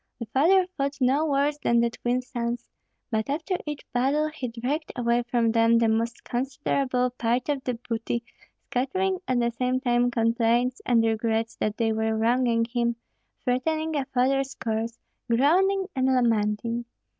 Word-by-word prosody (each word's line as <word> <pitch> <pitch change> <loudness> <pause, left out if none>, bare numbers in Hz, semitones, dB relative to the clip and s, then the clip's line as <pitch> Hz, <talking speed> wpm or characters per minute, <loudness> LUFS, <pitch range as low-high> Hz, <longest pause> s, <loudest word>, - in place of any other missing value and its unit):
The 230 - -5
father 360 +7 +5
fought 280 0 -2
no 275 +5 +2
worse 285 +1 +1
than 235 -4 +2
the 235 0 +2
twin 245 +2 -1
sons, 240 -1 -4 0.4
but 220 +2 -1
after 315 +6 -1
each 295 -1 -4
battle 280 +5 +1
he 300 -5 -5
dragged 255 +7 -3
away 240 -1 +1
from 235 -2 +2
them 230 0 +4
the 230 0 +3
most 230 +2 -1
considerable 255 0 -1
part 245 +2 -1
of 280 -2 -1
the 250 - -1
booty, 230 0 -3 0.4
scattering 375 +9 -1
at 255 -1 +1
the 235 0 +1
same 250 +2 0
time 245 -2 +2
complaints 235 +1 +1
and 235 -2 +4
regrets 225 0 0
that 215 0 -2
they 225 -2 +1
were 220 0 0
wronging 230 0 +2
him, 235 0 -1 0.5
threatening 310 +5 0
a 280 -2 0
father's 270 +2 0
curse, 225 +1 -3 0.3
groaning 370 +11 +3
and 260 0 +1
lamenting. 230 -2 +1
245 Hz, 155 wpm, -26 LUFS, 230-275 Hz, 0.5 s, father